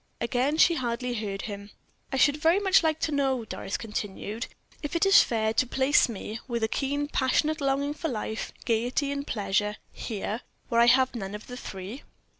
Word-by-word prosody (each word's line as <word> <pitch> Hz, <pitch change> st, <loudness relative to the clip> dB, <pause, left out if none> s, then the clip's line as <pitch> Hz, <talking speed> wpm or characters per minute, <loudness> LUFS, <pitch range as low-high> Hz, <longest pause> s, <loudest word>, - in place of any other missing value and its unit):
Again 255 Hz, +6 st, 0 dB
she 335 Hz, -, +6 dB
hardly 250 Hz, -3 st, -2 dB
heard 205 Hz, -3 st, -3 dB
him. 200 Hz, -1 st, -6 dB, 0.4 s
"I 270 Hz, -, -1 dB
should 285 Hz, +3 st, +4 dB
very 325 Hz, +4 st, +4 dB
much 390 Hz, -1 st, +5 dB
like 315 Hz, -2 st, +1 dB
to 310 Hz, -, 0 dB
know," 270 Hz, -4 st, +1 dB
Doris 200 Hz, -, -4 dB
continued, 210 Hz, +1 st, -4 dB, 0.3 s
"if 295 Hz, +3 st, -4 dB
it 335 Hz, -, +3 dB
is 390 Hz, +1 st, +8 dB
fair 220 Hz, -2 st, 0 dB
to 255 Hz, -, +2 dB
place 265 Hz, +2 st, +3 dB
me, 220 Hz, 0 st, -5 dB
with 235 Hz, -3 st, -2 dB
a -, -, +3 dB
keen, 285 Hz, +4 st, -1 dB
passionate 300 Hz, +3 st, +1 dB
longing 280 Hz, +1 st, +1 dB
for 315 Hz, +2 st, -3 dB
life, 220 Hz, -4 st, -3 dB
gayety, 245 Hz, +5 st, 0 dB
and 280 Hz, 0 st, -4 dB
pleasure, 205 Hz, 0 st, 0 dB, 0.2 s
here, 215 Hz, +1 st, -4 dB, 0.3 s
where 235 Hz, -1 st, +4 dB
I 235 Hz, -, +6 dB
have 260 Hz, +1 st, +5 dB
none 200 Hz, -4 st, -5 dB
of 210 Hz, -, -9 dB
the 250 Hz, -, -8 dB
three." 205 Hz, +1 st, -7 dB
250 Hz, 190 wpm, -27 LUFS, 220-285 Hz, 0.4 s, is